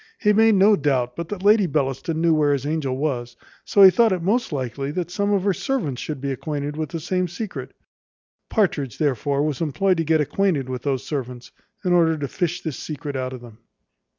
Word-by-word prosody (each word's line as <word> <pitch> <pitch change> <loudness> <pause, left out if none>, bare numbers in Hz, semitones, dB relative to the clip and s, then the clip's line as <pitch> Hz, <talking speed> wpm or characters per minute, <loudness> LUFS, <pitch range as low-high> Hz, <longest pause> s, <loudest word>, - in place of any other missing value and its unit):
He 210 -1 +3
made 220 0 +5
no 200 +2 +6
doubt 130 -6 0
but 170 -1 -5
that 200 -3 -5
Lady 205 -1 +5
Bellaston 140 +1 -1
knew 165 -1 +4
where 150 -2 +3
his 140 -1 -2
angel 145 -4 -1
was, 125 -5 -3 0.3
so 200 - +4
he 190 - +10
thought 225 +4 +3
it 180 -3 -1
most 225 +5 0
likely 135 0 -3
that 175 +3 -4
some 200 +2 0
of 200 -2 +1
her 200 -1 +2
servants 160 - -2
should 150 -3 -5
be 140 +1 -3
acquainted 145 +1 -4
with 155 -1 -3
the 165 - -4
same 180 +3 -1
secret. 185 +5 -7 0.7
Partridge 150 - 0
therefore 140 0 0
was 150 -1 -2
employed 180 +4 +1
to 165 - +1
get 160 0 +2
acquainted 150 -3 0
with 125 -1 -4
those 135 -2 -1
servants, 125 -4 -5 0.3
in 180 - +2
order 165 -2 +3
to 145 -2 -3
fish 175 +5 -2
this 155 -7 -4
secret 150 -2 -6
out 130 -1 -3
of 130 -2 -8
them. 115 -2 -14
155 Hz, 210 wpm, -22 LUFS, 135-185 Hz, 0.7 s, he